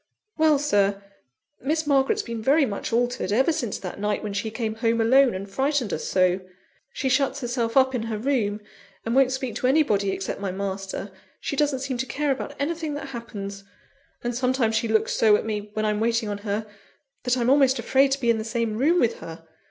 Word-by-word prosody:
"Well, 310 -2 +4
Sir, 205 -8 +2 0.6
Miss 310 +4 0
Margaret's 275 -2 +2
been 230 -2 -5
very 280 +6 +4
much 200 -5 -4
altered, 240 -3 0
ever 260 +9 +3
since 260 -10 -2
that 185 0 -7
night 210 +1 -1
when 210 -1 -4
she 205 +2 -2
came 220 0 -3
home 230 +1 0
alone, 255 +1 +4
and 195 +1 -5
frightened 265 +1 0
us 155 - -3
so. 185 0 +2 0.5
She 270 - -3
shuts 275 +2 +1
herself 240 -1 -1
up 265 0 +5
in 250 - -1
her 220 - -2
room, 215 -4 0 0.4
and 230 - -1
won't 265 0 +4
speak 260 -3 -3
to 250 - 0
anybody 235 -9 +2
except 190 0 -3
my 200 -2 -3
master; 195 +1 -4 0.3
she - - -3
doesn't 285 -2 +1
seem 265 -2 -3
to 260 - -2
care 290 +4 -1
about 280 +2 -4
anything 315 0 -2
that 285 -1 -6
happens; 200 -5 -7 0.6
and 240 0 -1
sometimes 250 -2 +1
she 225 +1 +1
looks 220 0 +1
so 215 -2 +5
at - - -1
me, 210 -1 -3
when 215 0 -1
I'm 210 -1 0
waiting 230 -1 0
on 205 -1 -3
her, 210 +1 -3 0.6
that 250 0 +1
I'm 245 +1 +2
almost 270 -1 +4
afraid 270 +1 +3
to 275 - -2
be 240 -3 +3
in 225 - 0
the - - -3
same 225 -1 -2
room 330 +7 +3
with 235 -5 +1
her. 165 0 -9
235 Hz, 210 wpm, -24 LUFS, 210-270 Hz, 0.6 s, up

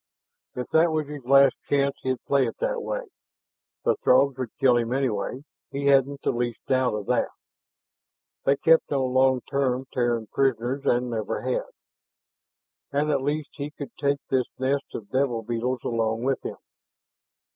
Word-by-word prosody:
If 125 -1 -4
that 165 +1 +4
was 155 -1 0
his 145 -2 -8
last 135 +1 +6 0.2
chance, 140 -1 +2
he'd 130 -1 -2
play 140 -2 +3
it - - -6
that - - -1
way. - - -3 0.8
The - - +3
Throgs 140 - +4
would 130 -3 -2
kill 130 -2 +5
him 120 +1 -1
anyhow, 130 -1 -1 0.3
he 140 0 -4
hadn't 140 0 +3
the - - +2
least 120 -1 -2
doubt 130 -4 +1
of 105 -1 -4
that. - - +1 1.2
They 140 - +4
kept 165 +2 +4
no 135 -2 +1
long 130 0 +3
term 130 -1 -1
Terran 120 -3 0
prisoners 130 0 0
and 120 0 +2
never 110 -2 -2
had. 130 0 -1 1.2
And 150 +2 +1
at 140 -2 +1
least 145 +2 -2
he 145 +1 -5
could 145 -2 -8
take 140 -1 +2
this 130 -2 +2
nest 135 +2 0
of 105 -2 -7
devil 130 -4 0
beetles 120 +2 -2
along 115 0 -1
with 135 0 0
him. - - -5
130 Hz, 165 wpm, -25 LUFS, 120-140 Hz, 1.2 s, last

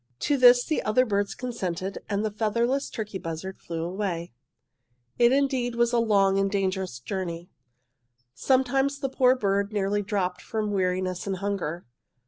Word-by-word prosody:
"'To 290 - +1
this 245 -2 +6
the 310 - 0
other 235 +4 +2
birds 205 -3 -1
consented, 195 -7 -4
and 205 +1 0
the 215 - -1
featherless 235 +6 0
turkey 210 -3 -5
buzzard 165 +2 -6
flew 165 -1 -5
away. 175 - -3 0.9
"'It 240 0 +6
was 265 - +3
indeed 260 -4 0
a 235 0 +2
long 195 -4 +3
and 195 0 +1
a - - -12
dangerous 190 -7 -1
journey. 170 +5 -5 0.8
Sometimes 270 - +1
the 270 -1 -3
poor 255 -1 +4
bird 200 -3 0
nearly 205 0 0
dropped 190 -3 -2
from 215 -2 -3
weariness 185 -1 -1
and 195 - -1
hunger. 180 -4 -3
205 Hz, 155 wpm, -26 LUFS, 185-240 Hz, 0.9 s, this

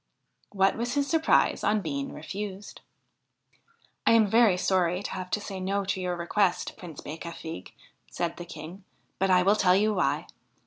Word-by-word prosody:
What 195 -1 +2
was 240 +3 -2
his 285 -1 +2
surprise 320 +2 +2
on 215 0 +2
being 140 -5 -3
refused! 195 +5 -7 0.6
' 465 0 -23
I - - +7
am 225 -1 +6
very 215 -2 +4
sorry 180 0 +1
to - - -5
have 185 -1 -5
to 210 - 0
say 195 -2 -6
no 195 +1 -1
to 190 0 -2
your 180 -1 -1
request, 180 +1 0
Prince 165 -5 -10
Becafigue,' 160 - -8 0.4
said 170 -1 -3
the 175 - -7
King, 170 +4 -9 0.2
' - - -44
but 195 +1 +2
I 180 -1 +5
will 200 +3 +4
tell 185 -3 +4
you 210 +2 +2
why. 145 -6 0
190 Hz, 180 wpm, -27 LUFS, 175-210 Hz, 0.6 s, I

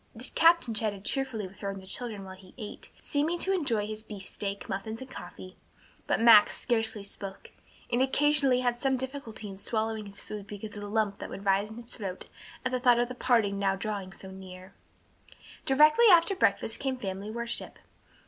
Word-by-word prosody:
The 235 +3 -9
captain 335 -7 +5
chatted 205 -2 -2
cheerfully 260 -7 -1
with 195 - -16
her 200 - -3
and 195 0 -5
the 190 - -13
children 215 0 -6
while 190 - -8
he 185 -1 -17
ate, 215 -4 -8
seeming 305 +4 0
to 385 +3 +1
enjoy 240 - +1
his 215 0 -5
beefsteak, 200 -1 -5
muffins 215 +3 -4
and 260 0 -9
coffee; 185 -3 -10 0.5
but - - +2
Max 225 -2 +7
scarcely 225 -3 0
spoke, 195 -1 -8 0.4
and 240 +1 +2
occasionally 275 -1 +4
had 245 -1 0
some 270 -1 +2
difficulty 260 -5 -6
in 195 -1 -9
swallowing 220 -1 -2
his 200 0 -10
food 205 -1 -8
because 210 +1 -7
of 205 - -6
the 205 - -5
lump 210 -2 0
that - - -6
would 200 - -8
rise 195 +2 +2
in 220 - -9
his 240 0 -9
throat 195 -6 -7 0.4
at 255 - +1
the 255 - 0
thought 245 -1 +5
of 240 0 +1
the - - -4
parting 225 -6 +2
now 195 -1 +2
drawing 195 -1 -4
so 190 0 -11
near. 190 0 -11 0.9
Directly 305 - +6
after 345 +3 +5
breakfast - - +1
came 265 -1 -1
family 195 -2 -5
worship. 235 +1 -4
220 Hz, 195 wpm, -29 LUFS, 200-255 Hz, 0.9 s, Max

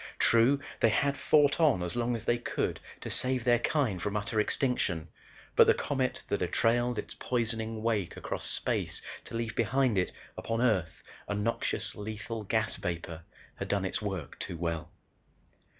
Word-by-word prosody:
True 115 +5 +4 0.2
they 115 - +5
had 140 +5 +2
fought 145 0 +4
on 145 - +4
as 90 0 -3
long 120 0 0
as 115 -1 -5
they 120 - +2
could - - -2 0.2
to - - -5
save 130 -1 +2
their 120 -1 +4
kind 120 - 0
from 105 +2 -1
utter 105 +1 -1
extinction 100 - 0 0.5
but - - +7
the - - +6
comet 130 -2 -1
that - - -1
had - - -1
trailed 120 +1 +2
its - - -4
poisoning 115 -2 -2
wake 105 -6 0
across - - -3
space - - 0 0.2
to - - -8
leave 115 -1 -2
behind 115 -1 +2
it, 90 - 0 0.2
upon 115 0 -2
Earth, 100 -10 +1 0.2
a 100 - -1
noxious, 105 +3 -1
lethal 110 +1 -5
gas 110 +2 0
vapor, 85 -1 -4 0.4
had - - -4
done 100 -2 0
its 95 - -1
work 95 -9 -4
too 85 - -4
well." 85 -2 -3
115 Hz, 170 wpm, -30 LUFS, 100-120 Hz, 0.5 s, but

